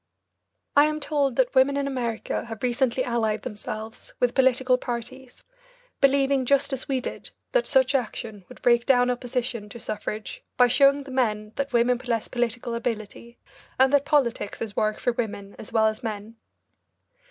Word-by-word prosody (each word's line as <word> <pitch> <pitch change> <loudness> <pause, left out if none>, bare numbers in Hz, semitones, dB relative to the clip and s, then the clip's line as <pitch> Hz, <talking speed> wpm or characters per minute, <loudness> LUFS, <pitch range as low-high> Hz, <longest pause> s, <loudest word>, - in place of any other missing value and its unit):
I 290 +1 +7
am 305 0 -1
told 285 -3 0
that 260 -2 +2
women 275 +1 +4
in 280 - 0
America 240 -6 -3
have 225 0 -8
recently 250 0 +1
allied 220 -3 -1
themselves 220 0 -7
with 245 -1 +2
political 260 -1 +3
parties, 245 +1 -7 0.5
believing, 275 -1 +3
just 280 +2 +2
as 265 - -4
we 265 -1 +1
did, 250 - -6 0.2
that - - +2
such 265 -1 +3
action 220 -5 -3
would 250 - -14
break 235 -1 +3
down 250 -2 +4
opposition 245 -3 -3
to 220 - -9
suffrage 215 0 -5
by 250 - +7
showing 275 +3 +4
the 270 - -10
men 215 -5 0
that 280 0 -2
women 240 0 +3
possess 235 -3 -2
political 240 -1 -2
ability, 235 0 -5 0.4
and 265 +1 +4
that 285 -1 +5
politics 255 -8 0
is 215 -3 -5
work 215 -1 0
for 245 - 0
women 205 -4 -4
as 230 - -9
well 220 -1 +3
as 215 0 0
men. 215 0 -6
245 Hz, 165 wpm, -25 LUFS, 225-265 Hz, 0.5 s, I